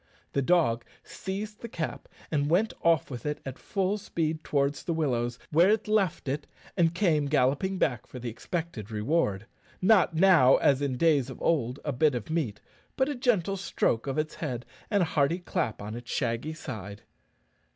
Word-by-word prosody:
The 140 Hz, -, +2 dB
dog 135 Hz, -7 st, +2 dB, 0.2 s
seized 205 Hz, +3 st, -6 dB
the 235 Hz, -, -6 dB
cap, 165 Hz, -6 st, -4 dB, 0.2 s
and 145 Hz, -2 st, +1 dB
went 195 Hz, +7 st, +2 dB
off 165 Hz, -4 st, +2 dB
with 120 Hz, -3 st, -6 dB
it 150 Hz, 0 st, -2 dB
at 135 Hz, -1 st, -6 dB
full 195 Hz, +1 st, -1 dB
speed 160 Hz, -5 st, -2 dB
towards 140 Hz, 0 st, 0 dB
the 170 Hz, -, -2 dB
willows, 120 Hz, -6 st, 0 dB
where 170 Hz, +5 st, +5 dB
it 215 Hz, +1 st, +2 dB
left 200 Hz, -9 st, +1 dB
it, 145 Hz, +2 st, -2 dB, 0.3 s
and 170 Hz, -2 st, +2 dB
came 160 Hz, -7 st, +2 dB
galloping 145 Hz, +7 st, +1 dB
back 120 Hz, -, 0 dB
for -, -, -9 dB
the 125 Hz, 0 st, -6 dB
expected 120 Hz, -, -4 dB
reward 105 Hz, -, 0 dB, 0.3 s
not 185 Hz, -4 st, +4 dB
now, 165 Hz, -7 st, +6 dB
as 140 Hz, -1 st, +3 dB
in 135 Hz, -3 st, -1 dB
days 145 Hz, -4 st, +3 dB
of 130 Hz, -, -8 dB
old, 135 Hz, -5 st, 0 dB
a 145 Hz, -, -1 dB
bit 145 Hz, +2 st, +3 dB
of 120 Hz, +5 st, -5 dB
meat, 135 Hz, -11 st, -1 dB, 0.3 s
but 265 Hz, +2 st, +1 dB
a 290 Hz, -, -2 dB
gentle 205 Hz, -6 st, +1 dB
stroke 120 Hz, -9 st, 0 dB
of 135 Hz, -, -2 dB
its 155 Hz, 0 st, -1 dB
head 125 Hz, -6 st, -4 dB, 0.2 s
and 205 Hz, -3 st, +3 dB
a 165 Hz, -, -4 dB
hearty 150 Hz, +3 st, +2 dB
clap 115 Hz, -, -3 dB
on 105 Hz, +1 st, -5 dB
its 120 Hz, 0 st, -9 dB
shaggy 120 Hz, +5 st, -1 dB
side. 105 Hz, -9 st, -7 dB
150 Hz, 180 wpm, -28 LUFS, 125-175 Hz, 0.3 s, now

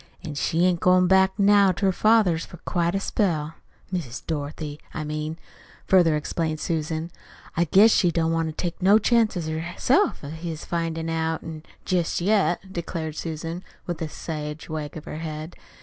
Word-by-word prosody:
An' 155 Hz, -, -5 dB
she 165 Hz, +4 st, +1 dB
ain't 180 Hz, -2 st, +2 dB
goin' 180 Hz, +1 st, +4 dB
back 190 Hz, +1 st, +4 dB
now 200 Hz, -1 st, +5 dB
to 195 Hz, -, -2 dB
her 190 Hz, -, +4 dB
father's 195 Hz, -5 st, +3 dB
for 175 Hz, -, -11 dB
quite 170 Hz, 0 st, 0 dB
a -, -, +1 dB
spell 165 Hz, -7 st, 0 dB, 0.4 s
Miss 145 Hz, -10 st, -4 dB
Dorothy, 150 Hz, -1 st, -4 dB, 0.2 s
I 155 Hz, -, -2 dB
mean," 155 Hz, +1 st, -4 dB, 0.5 s
further 175 Hz, -5 st, +5 dB
explained 155 Hz, +1 st, -2 dB
Susan. 160 Hz, 0 st, -2 dB, 0.4 s
"I 170 Hz, -, +2 dB
guess 200 Hz, +7 st, +6 dB
she 180 Hz, -, +4 dB
don't 165 Hz, -1 st, +1 dB
want 165 Hz, 0 st, 0 dB
to -, -, -3 dB
take 175 Hz, +3 st, -4 dB
no 195 Hz, +3 st, +6 dB
chances 220 Hz, -6 st, +2 dB
herself 170 Hz, -, 0 dB
of 140 Hz, -, -6 dB
his 160 Hz, -1 st, -6 dB
findin' 165 Hz, -1 st, -2 dB
out 160 Hz, 0 st, -1 dB, 0.4 s
jest 180 Hz, -3 st, 0 dB
yet," 190 Hz, -1 st, +1 dB
declared 160 Hz, -2 st, -4 dB
Susan, 165 Hz, +2 st, -5 dB, 0.2 s
with 175 Hz, -2 st, -4 dB
a 160 Hz, -, -2 dB
sage 150 Hz, -1 st, -6 dB
wag 155 Hz, -1 st, -5 dB
of 155 Hz, -, -9 dB
her -, -, -6 dB
head. 155 Hz, 0 st, -6 dB
165 Hz, 170 wpm, -25 LUFS, 155-185 Hz, 0.5 s, guess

